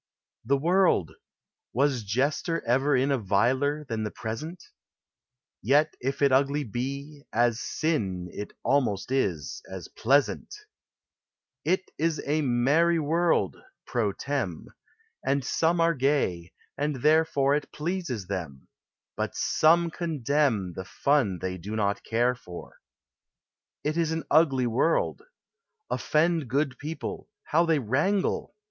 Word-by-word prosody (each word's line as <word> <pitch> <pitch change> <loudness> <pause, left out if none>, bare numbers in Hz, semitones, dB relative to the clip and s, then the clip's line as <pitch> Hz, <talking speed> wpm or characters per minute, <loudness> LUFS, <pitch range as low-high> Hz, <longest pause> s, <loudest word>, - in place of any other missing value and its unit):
] - - -43
The 140 - +5
World! 170 - +3 0.6
Was 135 0 +2
jester 140 - 0
ever 135 +4 +2
in 135 +2 +2
A 135 - +2
viler 130 +9 +1
than 115 -5 -3
the 105 - -2
present? 150 - -6 1.0
Yet 150 +6 +3
if 135 +3 -2
it 140 - +5
ugly 140 +2 +2
be 140 +5 -5
— - - -46
as 120 -1 0
sin, 100 - -1
It 105 - -6
almost 125 -6 +1
is 90 - -1
— - - -17
as - - -7
pleasant! 140 - +1 1.1
It 185 0 0
is 165 0 +1
a 150 +2 +1
merry 145 +7 +3
world 165 +2 +1 0.3
{pro - - 0
tern.); - - -3 0.5
And 135 0 0
some 165 +5 +1
are 165 0 +4
gay, 130 - 0 0.3
and 145 -3 -2
therefore 150 -3 +3
It 150 0 -2
pleases 155 - -3
them 85 -9 -6 0.2
— - - -66
but - - -3
some 170 +2 +3
condemn 140 - 0
The 95 +2 -6
fun 135 -9 +1
they 90 +1 -4
do 105 +6 -5
not 100 -2 0
care 120 +2 +1
for. 90 -9 -11 1.0
It 155 +2 -1
is 165 -2 +1
an 160 0 -2
ugly 140 -5 +4
world. 130 - +1 0.7
Offend 160 -1 +1
Good 135 +2 -1
people 160 +6 -6
— - - -61
how 170 +2 +4
they 165 -2 +3
wrangle 150 - 0
140 Hz, 135 wpm, -27 LUFS, 115-155 Hz, 1.1 s, The